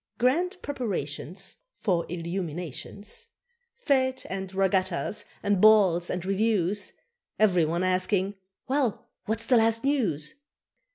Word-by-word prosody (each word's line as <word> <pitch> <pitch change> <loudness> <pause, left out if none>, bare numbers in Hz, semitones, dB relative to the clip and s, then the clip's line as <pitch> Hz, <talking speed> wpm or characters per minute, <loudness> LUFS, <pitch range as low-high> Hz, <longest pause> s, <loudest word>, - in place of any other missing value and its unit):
Grand 345 - +1
preparations 195 - -4 0.2
For 175 -5 0
illuminations. 175 - -5 0.6
Fêtes 260 -2 +2
and 190 -1 -4
regattas, 190 0 +1 0.2
and 200 -2 +2
balls 195 -6 +5
and 180 0 -3
reviews, 195 -1 +1 0.4
Ev'ry 180 -6 +4
one 170 +3 -1
asking, 185 +2 +1 0.3
"Well, 265 -4 0 0.2
what's 225 +1 -1
the 250 - +4
last 225 0 +3
news?" 205 - +1
195 Hz, 105 wpm, -27 LUFS, 180-225 Hz, 0.6 s, balls